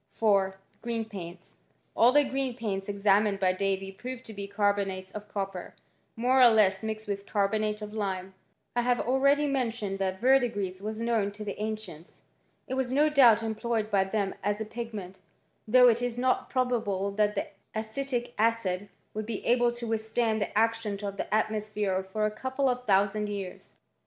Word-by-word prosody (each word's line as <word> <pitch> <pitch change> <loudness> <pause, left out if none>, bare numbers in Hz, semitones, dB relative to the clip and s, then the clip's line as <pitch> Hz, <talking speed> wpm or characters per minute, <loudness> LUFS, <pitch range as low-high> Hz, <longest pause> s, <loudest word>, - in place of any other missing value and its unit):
' - - -48
4. 195 -3 +2 0.3
Oreen 230 -2 -2
paints. 180 -4 -9 0.4
All 240 +2 +6
the 290 +2 +5
green 270 -2 -2
paints 200 -4 -3
examined 200 0 +2
by 185 -1 +3
Davy 195 0 -1
proved 255 +5 -8
to 220 - -9
be 200 -1 -6
carbonates 200 -2 -1
of 210 0 -8
copper, 195 -3 -5 0.4
more 255 +3 +3
or 250 - +10
less 210 -4 +4
mixed 220 0 -4
with 200 0 -4
carbonate 210 +1 0
of 210 0 -7
lime. 190 -3 -3 0.4
I 240 - +3
have 245 0 +1
already 275 +4 +3
men* 270 -4 +1
tioned 205 -4 -4
that 190 -1 -1
verdigris 225 -8 +2
was 215 +1 -4
known 225 -3 0
to 210 +1 -8
the 205 0 -5
ancients. 215 -7 -6 0.4
It - - -4
was 260 -1 -1
no 295 +3 +4
doubt 240 -7 +6
employed 220 0 -2
by 195 -1 +3
them 195 0 -1
as 205 +1 0
a 220 - -3
pigment, 215 -5 -7 0.5
though 250 +3 +7
it 235 0 +3
is 245 -1 -2
not 255 +1 +1
probable 220 -7 0
that 210 +1 +1
the 200 - -2 0.3
acetic 240 +2 -3
acid 205 -4 +1 0.2
would 215 0 -4
be 225 -3 -4
able 240 0 +3
to 240 0 -6
withstand 220 0 0
the 200 - -2
action 225 -2 +1
of 200 0 -4
the - - -4
atmosphere 215 -3 0
for 190 +3 -2
a 215 - 0
couple 260 +5 -1
of 250 -1 -1
thousand 205 +1 +2
years. 195 -3 -7
215 Hz, 180 wpm, -28 LUFS, 200-235 Hz, 0.5 s, or